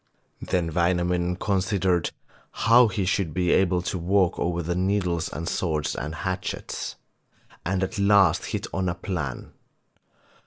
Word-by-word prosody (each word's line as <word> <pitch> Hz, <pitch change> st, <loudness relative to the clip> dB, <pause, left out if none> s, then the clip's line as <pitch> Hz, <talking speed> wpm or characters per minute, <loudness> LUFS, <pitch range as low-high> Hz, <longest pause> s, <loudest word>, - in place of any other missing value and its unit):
Then 85 Hz, -3 st, -1 dB
Wainamoinen 90 Hz, 0 st, +1 dB
considered 95 Hz, -3 st, 0 dB, 0.4 s
how 120 Hz, +2 st, +5 dB
he 100 Hz, -2 st, -2 dB
should 90 Hz, -4 st, 0 dB
be 90 Hz, -1 st, +1 dB
able 90 Hz, -2 st, +3 dB
to 90 Hz, 0 st, -2 dB
walk 95 Hz, +1 st, +2 dB
over 85 Hz, 0 st, -1 dB
the 85 Hz, +2 st, -1 dB
needles 90 Hz, -3 st, 0 dB
and 85 Hz, +2 st, -5 dB
swords 80 Hz, -4 st, -1 dB
and 75 Hz, +5 st, -4 dB
hatchets, 95 Hz, +1 st, -4 dB, 0.7 s
and 95 Hz, +2 st, 0 dB
at 100 Hz, +3 st, -3 dB
last 100 Hz, -4 st, +4 dB
hit -, -, -3 dB
on 95 Hz, 0 st, 0 dB
a 85 Hz, -, -2 dB
plan. 80 Hz, -, -4 dB
90 Hz, 140 wpm, -25 LUFS, 85-95 Hz, 0.7 s, how